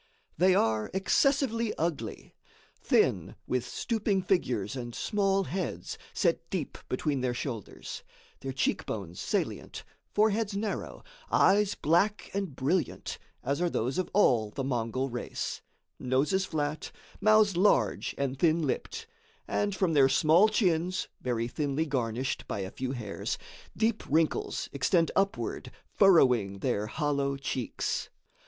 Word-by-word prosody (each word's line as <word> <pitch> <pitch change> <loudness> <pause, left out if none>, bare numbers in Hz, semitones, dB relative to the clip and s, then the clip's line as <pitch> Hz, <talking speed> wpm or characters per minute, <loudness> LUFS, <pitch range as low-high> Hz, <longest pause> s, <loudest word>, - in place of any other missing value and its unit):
They 185 +3 +4
are 110 - +1
excessively 230 +2 +2
ugly; 165 -2 -3 0.5
thin, - - +2
with 125 -1 0
stooping 200 - -1
figures 125 - 0
and 120 -2 -6
small 195 -2 +1
heads 175 - -4 0.2
set - - 0
deep - - -4
between 135 +1 -1
their 125 -1 0
shoulders; 120 - -6 0.4
their 135 - -4
cheek 135 - -1
bones 95 -5 -5
salient, - - -2 0.3
foreheads 215 -1 +2
narrow, 210 0 -4 0.3
eyes 200 +1 +4
black 175 +7 +1
and 195 -8 -3
brilliant, 145 +3 -1 0.2
as 140 +5 -1
are 175 - +2
those 130 +2 -1
of 185 - -1
all 120 - +3
the 135 +6 -4
Mongol 130 0 -1
race; 120 -2 -4 0.4
noses 140 +10 +1
flat, 150 -2 -3 0.3
mouths 215 -3 +5
large 195 +4 +2
and 135 -1 -2
thin 165 0 +3
lipped; 455 - -3 0.4
and 205 -1 0
from 185 -3 +1
their 135 -3 +6
small 165 +10 +5
chins, 185 -4 +1
very 120 -2 -1
thinly 145 +4 -1
garnished 130 -2 -2
by 100 - -3
a 95 +1 -5
few 130 0 -3
hairs, 110 -6 -4 0.4
deep 225 +1 +1
wrinkles 155 +2 +1
extend 165 +5 +2
upward 195 0 -1 0.2
furrowing 125 - +4
their 100 +2 -1
hollow 140 +1 -1
cheeks. 130 -3 -3
150 Hz, 130 wpm, -29 LUFS, 125-195 Hz, 0.5 s, their